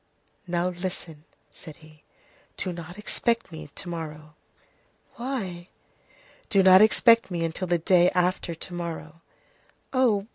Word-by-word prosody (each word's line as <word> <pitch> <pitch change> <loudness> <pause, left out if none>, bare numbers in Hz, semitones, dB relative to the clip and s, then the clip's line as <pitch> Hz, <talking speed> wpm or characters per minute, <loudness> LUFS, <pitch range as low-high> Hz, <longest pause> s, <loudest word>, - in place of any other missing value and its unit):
"Now, 175 +1 0
listen," 175 -4 -6 0.3
said 155 - -11
he, 155 -1 -18 0.6
"do 185 -2 -2
not 170 +2 -9
expect 230 0 -1
me 160 -2 -9
to - - -6
morrow." 155 -3 -7 0.8
"Why?" 195 -9 -5 0.8
"Do 195 -2 +4
not 185 +1 +8
expect 230 +1 +5
me 170 -2 -2
until 165 +3 -3
the 175 0 +2
day 175 +1 +4
after 180 -1 0
to 175 - -9
morrow." 165 -2 -6 0.7
"Oh! 230 -7 +2
175 Hz, 130 wpm, -26 LUFS, 165-195 Hz, 0.8 s, not